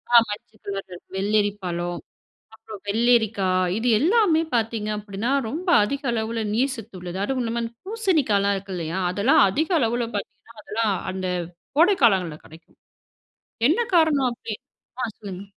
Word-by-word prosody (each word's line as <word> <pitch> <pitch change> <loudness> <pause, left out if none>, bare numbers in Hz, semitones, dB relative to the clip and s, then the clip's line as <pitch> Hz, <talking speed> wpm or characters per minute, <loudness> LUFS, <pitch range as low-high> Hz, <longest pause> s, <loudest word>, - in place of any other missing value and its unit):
ஆமா, - - +12
மஞ்சள் 210 +1 -9
கலர் 195 -3 -6 0.2
வெள்ளரி 205 +2 +2
பழம், 175 -1 -3 0.5
அப்புறம் 220 -2 -11
வெள்ளரிக்கா, 220 -2 +2 0.3
இது 230 +3 0
எல்லாமே 340 - +3
பாத்தீங்க 225 -2 0
அப்படினா 205 +3 -3 0.2
ரொம்ப 335 - -5 0.2
அதிக 280 +7 -3
அளவுல 225 0 -2
நீர் 260 +4 +1
சத்து 225 -5 -10
உள்ளது. 180 +1 -6
அதுவுமில்லாம 235 -1 -1
இந்த 230 - -6
பூசணிக்கால்லாம் 300 - +1
இருக்கில்லையா, 185 -3 -4
அதெல்லாம் 205 +8 +4
அதிக 305 +12 0
அளவில 240 -2 0
பாத்தீங்கனா 230 +3 -8
அதெல்லாம் 215 -2 0 0.2
அந்த 185 0 -4 0.5
கோடை 350 +6 +6
காலங்கள்ல 180 -8 +3
கிடைக்கும். 160 +1 -17 0.9
என்ன 325 - +2 0.2
காரணம் 300 -6 +4
அப்படின் 230 -2 -7 0.4
ஆ - - +1
சொல்லுங்க. 195 -2 -7
220 Hz, 135 wpm, -24 LUFS, 195-250 Hz, 0.9 s, ஆமா